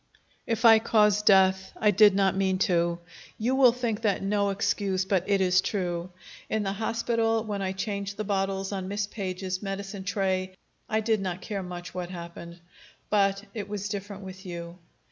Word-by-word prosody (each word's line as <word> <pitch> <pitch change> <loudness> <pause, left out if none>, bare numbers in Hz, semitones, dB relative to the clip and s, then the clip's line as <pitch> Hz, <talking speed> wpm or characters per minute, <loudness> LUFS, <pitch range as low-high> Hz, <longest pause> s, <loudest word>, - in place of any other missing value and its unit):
"If 230 0 0
I 225 -1 +9
caused 210 -2 +3
death, 190 -1 +4
I 210 - +4
did 205 0 +6
not 195 -1 +2
mean 190 -1 +1
to. 170 -1 +1 0.4
You 240 +4 0
will 265 -2 +6
think 235 -3 -2
that 205 -3 0
no 200 0 +1
excuse, 195 -1 0
but 190 -2 +1
it 200 -1 +3
is 185 0 +4
true. 180 -3 -2 0.4
In 220 -1 0
the 195 -1 -1
hospital, 225 +1 0
when 205 -2 -4
I 190 -1 -1
changed 200 0 -4
the 215 - -2
bottles 195 -1 -1
on 190 -2 -3
Miss 200 +1 -1
Page's 185 -2 -4
medicine 195 0 -5
tray, 190 -1 -1 0.3
I 220 0 +1
did 220 -1 +1
not 185 -1 -3
care 200 -2 -4
much 180 -1 -7
what 180 -1 -4
happened. 170 -1 -9 0.5
But 200 -1 +2
it 210 -3 -5
was 205 0 -4
different 200 -1 -6
with 190 0 -9
you. 170 -1 -7
195 Hz, 180 wpm, -27 LUFS, 185-210 Hz, 0.5 s, I